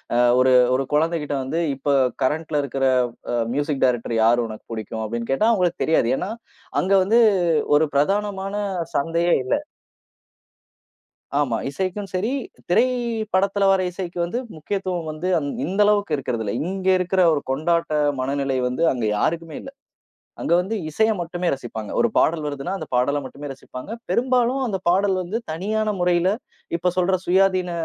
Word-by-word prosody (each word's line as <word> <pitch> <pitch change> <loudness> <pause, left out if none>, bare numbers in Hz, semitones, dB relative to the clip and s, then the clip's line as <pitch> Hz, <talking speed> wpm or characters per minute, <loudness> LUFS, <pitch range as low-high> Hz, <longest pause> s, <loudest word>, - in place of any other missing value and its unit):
அ - - +3 0.2
ஒரு 130 0 +4 0.2
ஒரு 135 +1 0
குழந்தைகிட்ட 155 -1 +1
வந்து 160 +6 -2
இப்ப 140 +1 0 0.3
கரண்ட்ல 150 +2 0
இருக்குற 135 0 -1 0.5
அ - - +1 0.2
மியூசிக் 145 0 -1
டைரக்டர் 120 -2 0
யாரு 120 +1 +4
உனக்கு 110 -1 -10
புடிக்கும் 110 0 -5
அப்டின்னு 115 +3 -3
கேட்டா, 215 +12 +3
அவுங்களுக்குத் 180 -5 +1
தெரியாது. 140 -7 +2
ஏன்னா 205 - -3 0.5
அங்க 190 +2 +1
வந்து 225 +5 +3 0.6
ஒரு 155 +1 +4
பிரதானமான 195 +5 0 0.4
சந்தையே 170 +3 +2
இல்ல. - - 0 1.9
ஆமா 125 -6 +1
இசைக்கும் 190 +6 -3
சரி, 215 +7 0 0.4
திரைப்படத்துல 215 -3 +1
வர 190 -1 +3
இசைக்கு 180 -1 -6
வந்து 205 +8 -3 0.2
முக்கியத்துவம் 180 0 -3
வந்து 155 +4 -4 0.4
இந்த 190 +5 -3
அளவுக்கு 205 -5 +2
இருக்கிறது 125 -4 -3
இல்ல. 100 - -3 0.2
இங்க 190 0 -4
இருக்கிற 185 +1 +1
ஒரு 145 - 0
கொண்டாட்ட 165 +3 0 0.3
மனநிலை 135 0 -1
வந்து 125 +6 -1
அங்க 120 -3 -2
யாருக்குமே 165 +5 -1
இல்ல. 270 - -9 0.7
அங்க - - -1
வந்து 190 +5 -3 0.2
இசைய 220 +8 +2
மட்டுமே 175 +1 -2
ரசிப்பாங்க. 110 -5 -7
ஒரு 235 - +4
பாடல் 160 -1 +2
வருதுன்னா 145 +5 -4
அந்தப் 155 - -7
பாடல 140 +4 +1
மட்டுமே 145 +3 -9
ரசிப்பாங்க. 130 +4 -10 0.2
பெரும்பாலும் 255 +1 +2
அந்தப் 190 -5 -4
பாடல் 190 +2 +3
வந்து 185 +6 -3
தனியான 210 +5 -1
முறையில 175 +1 +3 0.5
இப்ப 180 +1 0
சொல்ற 185 +1 +3
சுயாதீன 185 0 +3
170 Hz, 145 wpm, -22 LUFS, 140-195 Hz, 1.9 s, ஒரு